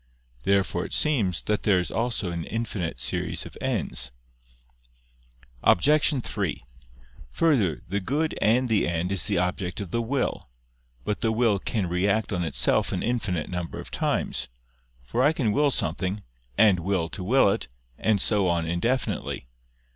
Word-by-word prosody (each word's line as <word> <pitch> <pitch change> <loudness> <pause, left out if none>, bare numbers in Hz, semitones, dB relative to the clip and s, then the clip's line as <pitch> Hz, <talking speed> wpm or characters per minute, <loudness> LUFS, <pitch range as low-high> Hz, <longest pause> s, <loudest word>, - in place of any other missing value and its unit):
Therefore 95 +1 +1
it - - -6
seems 110 - +1
that 105 -1 0
there 95 -3 +3
is 90 - -3
also 115 -5 -1
an 85 -1 -3
infinite 105 - -3
series - - -2
of - - -11
ends. - - -1 1.5
Obj. 145 - +4
3: 100 -6 -2 0.7
Further, 110 - +1
the 100 +3 -1
good 150 +10 -1
and 125 +4 +3
the 110 -3 +2
end 85 +2 -1
is 95 -5 0
the - - 0
object 90 +1 -1
of 100 -4 -6
the 115 - 0
will. 125 - -2 0.6
But 105 - -2
the 110 - +2
will 110 -3 +2
can 105 0 -1
react 100 +5 +1
on 90 -1 0
itself 80 -4 +2
an - - -2
infinite 105 -9 -1
number 90 -2 -4
of - - -9
times: - - -1 0.5
for 115 - -1
I 145 +4 +4
can 125 -9 0
will 145 +6 +3
something, 95 - -1 0.3
and 100 -4 +5
will 90 -1 0
to 95 - -6
will 120 +3 +4
it, - - -2 0.3
and 110 -2 +2
so 100 -1 +2
on 85 -1 +1
indefinitely. 85 - -1
100 Hz, 155 wpm, -26 LUFS, 90-115 Hz, 1.5 s, and